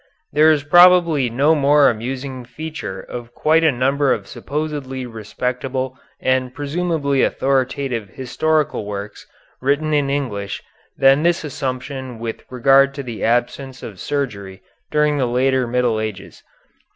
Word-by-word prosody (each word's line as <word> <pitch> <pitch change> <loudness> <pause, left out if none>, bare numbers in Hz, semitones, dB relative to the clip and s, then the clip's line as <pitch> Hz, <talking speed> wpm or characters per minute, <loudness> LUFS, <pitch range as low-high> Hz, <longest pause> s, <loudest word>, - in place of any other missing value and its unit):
There 155 +2 +6
is 150 -2 +3
probably 170 -4 +5
no 140 +7 +3
more 145 -1 +4
amusing 130 +3 -3
feature 150 -6 -7
of 120 -1 -9
quite 160 +2 +3
a 160 - +5
number 135 +2 +1
of - - -1
supposedly 145 -3 -4
respectable 125 +3 -4 0.2
and 130 -1 0
presumably 145 -2 -1
authoritative 130 -4 0
historical 145 -1 -1
works 100 0 -7 0.3
written 145 +4 +1
in 145 -2 +2
English 115 -8 -3 0.3
than 135 +2 +5
this 170 +1 +1
assumption 130 -2 -5
with 115 0 -6
regard 135 +2 +4
to 140 - -5
the 120 -4 -6
absence 125 +3 -1
of 100 -5 -8
surgery 100 -8 -4 0.3
during 150 -1 +2
the 130 - +1
later 130 +1 +1
Middle 120 -2 +1
Ages. 105 -3 -6
135 Hz, 130 wpm, -20 LUFS, 120-145 Hz, 0.3 s, There